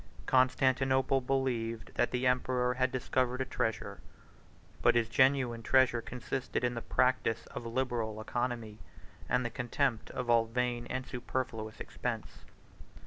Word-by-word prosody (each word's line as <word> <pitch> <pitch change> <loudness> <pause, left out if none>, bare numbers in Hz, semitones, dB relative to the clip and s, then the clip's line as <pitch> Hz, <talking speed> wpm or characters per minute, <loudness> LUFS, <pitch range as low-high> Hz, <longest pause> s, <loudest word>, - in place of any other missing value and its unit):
Constantinople 130 +1 +3
believed 125 -4 -1
that - - +1
the 125 +1 -1
emperor 125 0 +2
had 130 0 +1
discovered 130 0 0
a 130 - 0
treasure: 110 -3 -3 0.8
but - - +5
his 115 -1 +3
genuine 130 -1 +3
treasure 130 0 +3
consisted 125 +2 -3
in 125 0 +1
the 115 - -4
practice 125 -3 +1
of 115 - -5
liberal 115 -3 -2
economy, 115 -1 -3 0.5
and 125 0 +2
the 120 - -2
contempt 125 -1 -1
of 125 - -4
all 115 -1 +4
vain 120 0 -1
and 130 0 -3
superfluous 120 -3 -4
expense. - - -5
125 Hz, 135 wpm, -32 LUFS, 115-130 Hz, 0.8 s, but